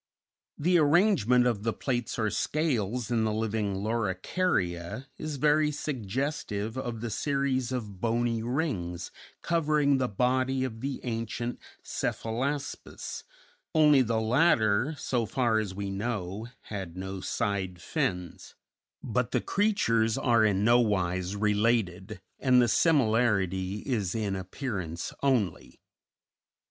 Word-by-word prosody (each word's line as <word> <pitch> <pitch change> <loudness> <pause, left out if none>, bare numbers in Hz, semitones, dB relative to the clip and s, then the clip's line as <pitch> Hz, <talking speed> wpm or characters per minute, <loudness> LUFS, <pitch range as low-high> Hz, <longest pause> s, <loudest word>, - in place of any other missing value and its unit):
The 175 +3 +3
arrangement 145 - +4
of 115 -5 +1
the 115 +1 -1
plates 120 -4 -2
or 110 -2 0
scales 125 -7 -1
in 115 -2 +2
the 110 - +1
living 105 -2 -1
Loricaria 100 - -1
is 155 -1 -4
very 150 +2 +3
suggestive 125 -5 -3
of 120 -4 -4
the 115 -1 -3
series 135 0 0
of 105 -7 -5
bony 115 0 +1
rings 110 - -2 0.3
covering 150 -4 +2
the 130 - +1
body 130 +4 +1
of 115 -3 -4
the 135 0 -3
ancient 115 0 -3 0.2
Cephalaspis, 135 +6 -3 0.5
only 150 -3 +6
the 115 -2 +1
latter, 115 +1 +3
so 120 -3 -1
far 115 0 +1
as 100 -3 -4
we 100 0 -3
know, 100 0 -3
had 95 -4 -6
no 95 +1 -5
side 95 -3 -2
fins; 90 0 -3 0.5
but 125 0 0
the - - +1
creatures 115 - +1
are 115 -3 +3
in 100 -2 +2
no 120 +2 +5
wise 95 -4 0
related, 105 -2 0 0.2
and 130 -2 +4
the 120 - +5
similarity 110 - +2
is 110 -8 -1
in 105 -3 -1
appearance 95 - -4
only. 120 -11 0
115 Hz, 120 wpm, -28 LUFS, 100-130 Hz, 0.5 s, only